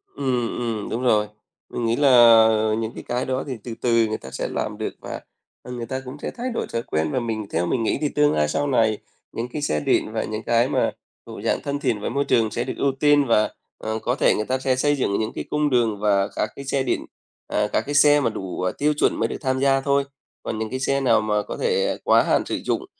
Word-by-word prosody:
Ừm, 125 -4 -1
ừm, 115 -4 -3
đúng 115 - -3
rồi. 105 -4 +3 0.4
Mình 120 - -3
nghĩ 115 - +1
là 145 +2 +3 0.7
những 110 0 -3
cái - - -8
cái 125 +1 -1
đó 130 +1 -2
thì 130 -3 -4
từ 120 - -6
từ 115 -2 +3
người 110 0 -2
ta 65 - -11
sẽ 65 - -3
làm - - -3
được - - -4
và, - - -6 0.4
ừ, 125 - -9
người 120 -1 -5
ta 130 +3 -4
cũng 130 +3 -8
sẽ - - -4
thay 250 +2 -3
đổi - - -3
thói 115 - 0
quen 80 -5 -1
và - - 0
mình 110 -3 -3
theo 85 +2 0
mình 115 +6 0
nghĩ - - 0
thì 150 - +1
tương 150 0 +2
lai 75 0 +2
sau 145 - -1
này, 110 -5 +2 0.3
những 115 - -4
cái 150 - -3
xe 75 - 0
điện 75 - +1
và 110 - -1
những 110 +1 -5
cái 120 +2 +2
mà - - +1 0.3
thuộc - - -9
dạng - - 0
thân 140 0 -3
thiện 115 -6 0
với - - -2
môi 140 0 -1
trường 110 -2 +2
sẽ - - -2
được - - -4
ưu 140 - +1
tiên 145 -1 +4
và, 110 -2 +3 0.3
ờ, 110 0 -3
có 125 +3 -1
thể - - +3
người 105 - -2
ta 130 +2 -1
sẽ 130 -1 +1
xây 145 +3 +2
dựng 130 -7 -1
những 110 0 -2
cái - - -4
cung 150 0 +1
đường 115 -5 +1
và 100 -2 +2
các 105 - -1
cái 140 - -8
xe 135 0 0
điện 125 - -1 0.4
à, 105 0 0
các - - +2
cái 145 +1 -3
xe 145 0 +6
mà 120 - +1
đủ 95 -4 -5
tiêu 150 +1 +2
chuẩn 150 - +1
mới - - +1
được - - -5
tham 130 -2 0
gia 135 0 +3
thôi, 140 0 +2 0.4
còn 110 - -4
những 110 -1 -3
cái 130 - -4
xe 140 +1 0
nào 130 -4 +3
mà 105 -1 0
có - - -7
thể 475 +1 0
quá - - +5
hạn - - +1
sử - - -2
dụng - - -1
120 Hz, 265 wpm, -23 LUFS, 110-140 Hz, 0.7 s, xe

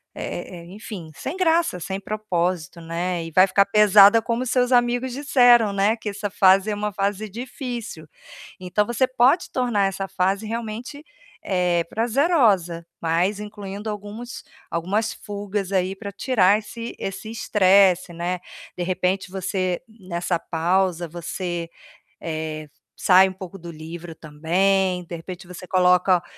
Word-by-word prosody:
eh 175 -2 -6
eh, - - -13
enfim, 200 -6 -8
sem 270 - -5
graça, 335 - +2
sem 190 +3 -4
propósito, 180 -5 -2
né, 170 +1 -3
e 165 - -8
vai 185 +4 +6
ficar 200 +1 +4
pesada 210 +1 +6
como 235 +2 -2
seus 250 0 +1
amigos 245 +1 +2
disseram, 245 -5 +4
né, 200 +3 +2
que 220 - -8
essa 205 0 -4
fase 195 +1 +4
é - - -1
uma 210 0 -3
fase 200 +2 -2
difícil. 235 - -6 0.5
Então 185 +3 0
você 240 +3 +1
pode 255 +7 +2
tornar 235 -6 +1
essa 195 0 -4
fase 195 +4 -1
realmente, 235 +6 -5 0.4
eh, 180 -3 +1
prazerosa, 225 - +2 0.2
mas 175 +5 +1
incluindo 210 0 -7
alguns 210 +3 -7 0.3
algumas 200 +7 -1
fugas 205 -1 -5
aí 190 0 0
pra 200 0 -7
tirar 200 -2 +3
esse 230 +2 -8
esse 195 +3 -5
estresse, 190 -4 +3
né? 175 +2 -3 0.4
De 180 - -2
repente, 185 +1 -1
você 185 -1 -2
nessa 180 -5 -3
pausa, 175 +1 0
você, 170 +1 -5 0.5
eh, 155 -1 -4 0.3
sai 190 0 +5
um - - -8
pouco 190 0 -10
do 170 0 -9
livro 165 +1 -9
também, 180 +4 0
de 170 - -7
repente, 175 +2 -9
você 180 0 -10
coloca 180 -1 +3
195 Hz, 140 wpm, -23 LUFS, 180-220 Hz, 0.5 s, vai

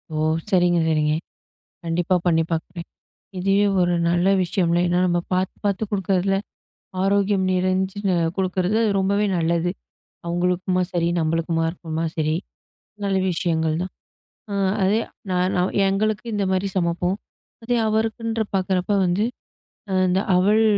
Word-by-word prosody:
ஓ, - - -1 0.3
சரிங்க, 175 -2 +3
சரிங்க. 150 -1 +2 0.7
கண்டிப்பா 175 +2 +1
பண்ணி 165 -2 +3
பார்க்குறேன். 170 +1 -4 0.5
இதுவே 195 +2 +2 0.2
ஒரு 175 0 +2
நல்ல 175 +1 +2 0.2
விஷயம்ல, 175 -1 +1
ஏன்னா 175 0 +1
நம்ம 175 -1 +1
பார்த்துப் 185 +1 -1
பார்த்து 200 +1 0
குடுக்குறதுல, 195 -1 +1 0.7
ஆரோக்கியம் 200 0 +2
நிறைஞ்சு 185 +2 0 0.4
குடுக்குறது 190 +2 0 0.2
ரொம்பவே 200 +2 +1
நல்லது. 170 +1 +1 0.6
அவங்களுக்குமா 180 +1 0
சரி, 170 -1 0
நம்மளுக்குமா 165 +1 0
இருக்குமா 165 -1 -4
சரி, 155 0 0 0.7
நல்ல 195 -1 +1
விஷயங்கள் 160 -2 0
தான். 185 - -4 0.6
ஆ - - -2 0.3
அதே, 200 +4 +3 0.3
நா 180 - +1 0.2
நான் 180 +1 0
எங்களுக்கு 215 +2 0
இந்த 205 - 0
மாரி 190 +1 0
சமப்போம். 175 +1 0 0.5
அதே 240 +1 0
அவருக்குன்ற 225 +1 -1
பார்க்கிறப்ப 185 0 0
வந்து, 180 +4 +1 0.8
அந்த 185 +1 +2 0.2
அவல் 210 +5 +4
180 Hz, 120 wpm, -22 LUFS, 170-195 Hz, 0.8 s, அவல்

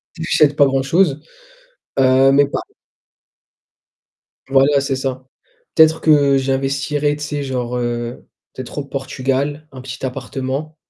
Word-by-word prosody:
tu - - -9
achète 150 -3 +2
pas 145 - +6
grand 135 -1 0
chose. 155 0 +2 0.8
Heu, 130 +1 +5
mais 140 0 +4
pas - - -3 1.9
Voilà, 135 +1 +4
c'est 135 -1 -2
ça. 130 -1 -4 0.5
Peut-être 160 0 +5
que 145 -3 +4
j'investirais, 135 +2 0
tu 150 - -9
sais, 145 0 -3
genre, 125 -2 -3
heu, 120 0 -4 0.3
peut-être 130 +3 -8
au 145 - -3
Portugal, 135 +2 -3
un 130 - -10
petit 130 +1 -8
appartement 135 +4 -4
135 Hz, 130 wpm, -18 LUFS, 130-145 Hz, 1.9 s, pas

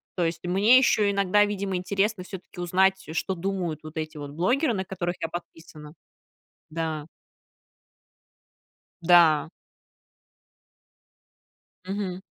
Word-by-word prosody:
То 180 - 0
есть, 165 +1 -3
мне 205 +8 +5
ещё 215 -5 +3
иногда, 200 +1 +3
видимо, 200 -2 -3
интересно 195 +2 -1
всё-таки 185 -1 -10
узнать, 190 +2 +2
э, - - -5
что 190 +3 -1
думают 180 -4 -3
вот 155 +1 -10
эти 155 -1 -4
вот 145 -1 -6
блогеры, 240 - +1
на 190 -1 -3
которых 175 -1 -3
я 165 - -3
подписана. 160 -3 -10 0.8
Да. 160 -2 -3 2.0
Да. 165 -2 +5 2.3
Мгм. 190 -1 -4
180 Hz, 110 wpm, -26 LUFS, 165-195 Hz, 2.3 s, мне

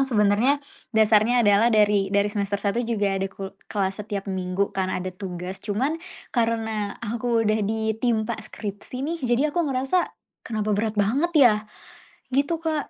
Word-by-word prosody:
memang 270 - +1
sebenarnya 215 +4 +3 0.3
dasarnya 220 +2 +4
adalah 205 +3 +5
dari 210 -2 +3
dari 200 0 +3
semester 200 -1 -1
1 205 +3 0
juga 210 -4 0
ada 195 0 -1
kul 195 0 -7 0.2
kelas 195 -1 -1
setiap 200 -1 -4
minggu 190 +1 -1
kan 190 -1 0
ada 185 0 -3
tugas. 185 0 -6
Cuman 240 +9 0 0.4
karena 225 -3 0
aku 230 +1 0
udah 215 +1 +2
ditimpa 220 +1 0
skripsi 215 +5 -6
nih 335 +1 -2
jadi 240 +2 +2
aku 345 - +2
ngerasa, 265 +7 +1 0.4
"Kenapa 215 -2 -2
berat 215 +1 -1
banget 265 +12 +2
ya?" 240 -6 +7 0.8
Gitu, 285 +5 +2
Kak, 315 -3 -2
215 Hz, 155 wpm, -24 LUFS, 200-240 Hz, 0.8 s, ya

